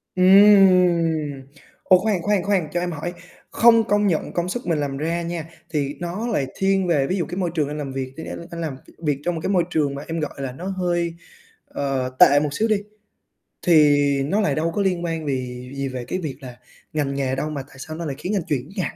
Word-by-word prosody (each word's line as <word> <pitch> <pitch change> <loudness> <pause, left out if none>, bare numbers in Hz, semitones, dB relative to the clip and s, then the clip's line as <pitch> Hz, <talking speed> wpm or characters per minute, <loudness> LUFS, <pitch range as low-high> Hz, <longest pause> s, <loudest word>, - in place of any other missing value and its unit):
Ừm. 180 -6 +5 0.4
Ồ, 185 - +6
khoan, 195 -3 0
khoan, 205 -2 +1
khoan, 195 -5 +1
cho 175 - +1
em 175 0 -2
hỏi, 170 +2 -5 0.4
không 230 -1 +5
công 205 0 +2
nhận 165 -5 -1
công 175 +1 -1
sức 240 0 -4
mình 165 -3 +1
làm 140 -2 -2
ra 165 +4 -1
nha, 170 -2 -4 0.3
thì 145 -2 -1
nó 180 +7 -4
lại 140 - 0
thiên 195 -1 +1
về 145 -5 +2
ví 185 - -1
dụ 170 - -1
cái 175 - -6
môi 185 -2 -1
trường 150 -3 +1
anh 150 - -5
làm 145 -3 -4
việc, 130 -1 -4
anh 160 - -6
anh 170 - -7
anh 170 - -5
làm 150 -5 -4
t - - -21
việc 145 -2 0
trong 175 -1 0
một 160 - -4
cái - - -1
môi 185 -3 +3
trường 145 -4 0
mà 140 - -6
em 165 0 -3
gọi 150 - -3
là 135 -2 -4
nó 165 +8 -9
hơi, 175 -3 -1 0.5
ờ, 135 -2 -2
tệ 145 - +7
một 150 0 -1
xíu 220 +7 +1
đi, 215 - +2 0.8
thì 155 -4 +5 0.3
nó 195 +10 +1
lại 150 -9 +1
đâu 165 +2 0
có 205 - +1
liên 180 -3 0
quan 165 -2 -3
vì 125 -2 -4
gì 140 0 -2
về 130 -2 -5
cái 185 - -3
việc 155 -7 -4
là 125 -2 -10 0.4
ngành 140 -3 -1
nghề 135 -1 -1
đâu 150 +3 -2
mà 145 -3 -4
tại 135 - -17
sao 155 +3 -7
nó 170 +1 -5
lại 140 -3 -3
khiến 185 +8 -3
anh 190 - 0
chuyển 140 -1 -2
hẳn - - -4
165 Hz, 245 wpm, -22 LUFS, 140-185 Hz, 0.8 s, tệ